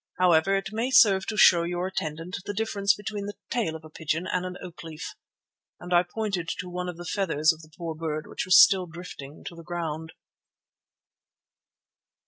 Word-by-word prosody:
However, 180 +1 +4
it 195 +1 -3
may 230 +4 -1
serve 200 -7 +5
to 215 - -3
show 175 -4 +7
your 175 +1 -2
attendant 165 -1 -4
the 205 - -3
difference 205 -2 +1
between 205 0 -5
the 205 - -6 0.2
tail 225 -11 0
of 160 0 -10
a - - -11
pigeon 160 +3 -2
and 180 -1 -1
an 180 0 -7
oak 175 -5 -10
leaf," 160 -1 -7 0.7
and 180 0 -5
I 175 - +6
pointed 185 -1 -3
to 180 +1 -6
one 180 0 -4
of 175 - -7
the 175 - -8
feathers 165 -5 +2
of 160 - -13
the 155 - -16
poor 165 -2 -4
bird, 155 -1 -4
which - - -4
was 185 -1 +6
still 185 -2 +6
drifting 160 -4 -10
to 170 - -8
the 170 - -10
ground. 160 -2 -4
180 Hz, 190 wpm, -26 LUFS, 160-195 Hz, 0.7 s, show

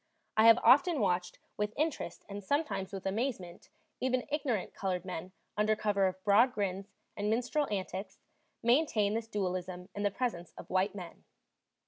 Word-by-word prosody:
I 220 +1 +6
have 230 - +9
often 295 +4 +6
watched 180 -4 0 0.2
with 210 +1 -2
interest 300 - -2
and 205 0 -7
sometimes 285 -5 -1
with 195 -1 -6
amazement 195 -4 -3 0.3
even 255 -1 0
ignorant 260 -9 -1
colored 185 -2 -2
men 180 0 -5 0.2
under 210 +1 +2
cover 205 -2 +2
of 185 0 -5
broad 225 +5 +5
grins 200 -1 -3 0.2
and 205 0 -1
minstrel 250 +6 +1
antics 190 0 -4 0.5
maintain 235 -5 +3
this 225 0 -2
dualism 185 -3 -3
in 205 - -4
the 205 - +2
presence 195 -6 -3
of - - -10
white 190 +2 +1
men. 180 -4 -9
205 Hz, 155 wpm, -32 LUFS, 185-235 Hz, 0.5 s, have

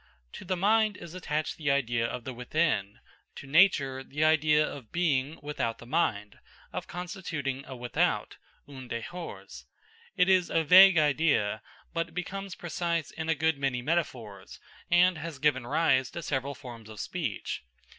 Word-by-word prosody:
To - - -8
the 185 0 -1
mind 215 +1 +3
is 170 - -10
attached 155 -4 -3
the 150 -3 -1
idea 120 -4 +1
of 120 - -5
the 130 - -6
within, 125 -5 -1 0.4
to - - -9
nature 135 -4 +3
the 150 +3 -2
idea 155 -1 +4
of 130 -6 -9
being 155 -4 0
without 145 -6 -2
the - - -12
mind, 110 -8 -1 0.3
of - - -5
constituting 170 -7 -4
a 130 - -7
"without" 120 -1 -1 0.3
(un 130 -3 -10
dehors). 165 +10 -7 0.5
It 180 - +4
is 185 -2 +3
a 165 - +2
vague 185 +3 +8
idea, 145 -9 +2 0.3
but 165 0 -3
becomes 195 +1 -5
precise 170 -2 -2
in 160 0 -5
a 160 - +3
good 160 0 +1
many 135 -3 -1
metaphors, 120 - -3 0.3
and 175 -1 +4
has 160 -1 -6
given 130 -3 +1
rise 140 -3 +2
to 170 - -7
several 140 0 -2
forms 115 -4 -11
of 110 -2 -10
speech. - - -4
150 Hz, 155 wpm, -29 LUFS, 130-170 Hz, 0.5 s, vague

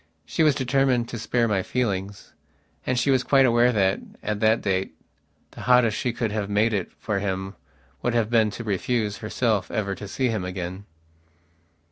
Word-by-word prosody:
She - - -2
was 155 -3 +4
determined 130 -2 +1
to 120 - -5
spare 120 +1 +1
my 100 -3 +1
feelings. 100 -3 -3 0.5
And 130 - +1
she 130 +3 +2
was 130 -2 +3
quite 135 +1 +4
aware 120 0 +4
that, 95 -4 +2 0.2
at 105 -1 -2
that 110 +1 +3
date, 95 -4 -1 0.6
the - - -10
hottest 125 -3 +4
she 125 - -1
could 115 -2 -2
have 105 -1 -2
made 105 +2 +2
it 95 -4 -2
for 105 -2 -2
him 95 -1 -3 0.5
would 120 - 0
have 115 -1 +1
been 110 -2 +4
to 120 - -5
refuse, 105 +1 -1
herself, 110 -1 -1
ever 105 -3 -2
to 105 +1 -8
see 130 +5 -1
him 110 -5 -2
again.... 90 +1 -5
110 Hz, 180 wpm, -24 LUFS, 100-125 Hz, 0.6 s, was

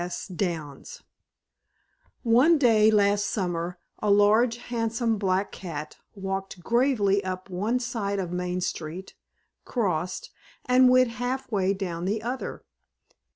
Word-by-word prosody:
S. 175 0 -5
Downs 165 -6 -5 1.2
One 255 +8 +5
day 225 -6 +5
last 205 -1 +3
summer 175 -3 -2 0.2
a 210 - -1
large 215 +4 +4
handsome 230 -2 -1
black 190 0 0
cat 155 -5 -7 0.2
walked 195 -2 -5
gravely 230 -5 +2
up 185 +1 -5
one 210 +7 0
side 225 -5 -2
of 180 -3 -3
Main 180 0 -2
street, 175 +1 -5 0.5
crossed, 185 -7 -2 0.3
and 255 0 +5
went 255 -1 +4
half 245 +2 -3
way 195 -2 +1
down 175 -3 -4
the 215 +3 -1
other. 250 +3 -5
200 Hz, 120 wpm, -26 LUFS, 185-235 Hz, 1.2 s, One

